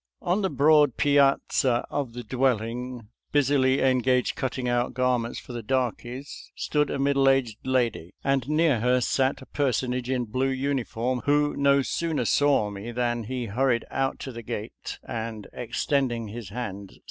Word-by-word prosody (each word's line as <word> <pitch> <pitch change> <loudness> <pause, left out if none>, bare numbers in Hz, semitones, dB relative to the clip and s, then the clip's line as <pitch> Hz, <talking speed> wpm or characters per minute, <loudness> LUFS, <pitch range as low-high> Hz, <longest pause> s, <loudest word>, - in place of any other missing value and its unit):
* - - -67
« 60 - -66
» - - -52
On 205 - 0
the 190 - +1
broad 150 -4 +4
piazza 140 -3 +3
of 140 -5 -2
the 120 0 -6
dwelling, 125 -1 -1 0.2
busily 135 -2 +3
engaged 130 -1 +2
cutting 130 -1 -2
out 120 0 0
garments 125 -2 0
for 125 - -9
the 120 - -4
darkies, 125 +2 -3
stood 150 -1 0
a - - -2
middle 140 0 +3
aged 130 -5 +1
lady, 120 -9 0
and 135 -1 0
near 155 -5 +3
her 125 +2 +3
sat 130 +2 0
a - - -13
personage 125 -3 -1
in 125 -2 0
blue 130 +4 0
uniform, 130 -2 -1
who 145 0 +2
no 140 0 +3
sooner 165 +2 -1
saw 140 -8 +3
me 100 +4 -6
than 120 -1 -1
he 125 +1 -3
hurried 120 +2 +1
out 135 0 -1
to 135 - -6
the 115 -1 -7
gate, 105 0 -6
and, 110 -2 -5
extend 130 +2 0
ing 115 -2 -4
his 110 -2 -7
hand, 100 -3 -5
said. - - -20
125 Hz, 175 wpm, -26 LUFS, 120-135 Hz, 0.2 s, broad